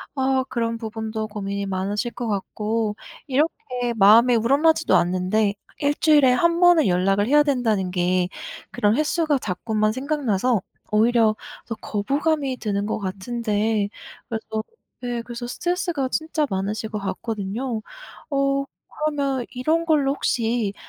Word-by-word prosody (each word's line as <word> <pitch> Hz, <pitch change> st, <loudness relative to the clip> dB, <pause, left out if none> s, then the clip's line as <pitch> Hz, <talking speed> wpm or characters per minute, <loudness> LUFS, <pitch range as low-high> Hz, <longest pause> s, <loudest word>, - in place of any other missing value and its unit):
아, 265 Hz, -1 st, +1 dB
그런 230 Hz, -1 st, -1 dB
부분도 220 Hz, -1 st, -4 dB
고민이 200 Hz, -1 st, -4 dB
많으실 200 Hz, +5 st, -2 dB
것 240 Hz, -1 st, -5 dB
같고 210 Hz, +1 st, -2 dB, 0.3 s
이렇게 270 Hz, -, -1 dB
마음에 225 Hz, +4 st, +6 dB
우러나지도 285 Hz, +8 st, +3 dB
않는데 185 Hz, +4 st, +1 dB, 0.3 s
일주일에 290 Hz, -2 st, +4 dB
1 340 Hz, +6 st, +2 dB
번은 350 Hz, -3 st, +6 dB
연락을 195 Hz, +3 st, +2 dB
해야 295 Hz, +3 st, +5 dB
된다는 225 Hz, -10 st, 0 dB
게 180 Hz, 0 st, +1 dB, 0.4 s
그런 210 Hz, +3 st, +2 dB
횟수가 305 Hz, 0 st, +1 dB
자꾸만 215 Hz, +1 st, -1 dB
생각나서 255 Hz, -5 st, 0 dB, 0.3 s
오히려 220 Hz, 0 st, +4 dB, 0.3 s
더 225 Hz, -, -3 dB
거부감이 275 Hz, +6 st, -1 dB
드는 205 Hz, -3 st, -2 dB
것 215 Hz, -, -2 dB
같은데 210 Hz, +1 st, -1 dB, 0.4 s
그래서 220 Hz, -1 st, -4 dB, 0.4 s
네, 245 Hz, -1 st, -3 dB
그래서 240 Hz, +1 st, -7 dB
스트레스가 345 Hz, -1 st, -1 dB
진짜 315 Hz, +1 st, -1 dB
많으실 200 Hz, +3 st, -2 dB
것 215 Hz, -, -4 dB
같거든요. 215 Hz, +4 st, -3 dB, 0.5 s
어, 275 Hz, 0 st, +1 dB, 0.4 s
그러면 280 Hz, -4 st, -1 dB
이런 315 Hz, +7 st, 0 dB
걸로 290 Hz, -4 st, +2 dB
혹시 230 Hz, -6 st, 0 dB
230 Hz, 295 characters per minute, -23 LUFS, 210-275 Hz, 0.5 s, 마음에